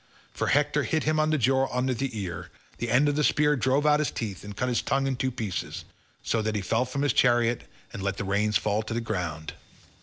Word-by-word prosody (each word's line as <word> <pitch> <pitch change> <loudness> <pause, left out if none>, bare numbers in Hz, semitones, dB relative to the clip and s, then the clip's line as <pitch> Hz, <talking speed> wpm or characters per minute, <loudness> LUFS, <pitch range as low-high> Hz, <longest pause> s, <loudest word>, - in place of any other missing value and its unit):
For - - -2
Hector 145 +1 +2
hit 155 +1 0
him 155 0 +1
on 155 0 +2
the 155 - +2
jaw 135 +1 +2
under 130 +1 0
the 125 -1 -3
ear; 90 -4 -5 0.3
the 120 - -2
end 135 +6 +4
of 145 - +1
the 150 - +1
spear 150 0 +3
drove 130 +4 +1
out 150 0 +5
his 150 - +1
teeth 105 -5 -5
and 105 0 -9
cut 125 - 0
his 125 -2 +1
tongue 135 0 0
in 135 -1 0
two 130 +1 -1
pieces, 110 -7 -4 0.4
so 115 - 0
that 110 0 -2
he 105 - 0
fell 115 +7 +1
from 140 +3 -3
his 145 -4 +2
chariot 120 -1 +3 0.3
and - - -6
let 100 0 -2
the - - -3
reins 105 +1 +2
fall 105 0 0
to 110 +1 -5
the - - +1
ground. 85 -8 -4
125 Hz, 245 wpm, -27 LUFS, 105-140 Hz, 0.4 s, out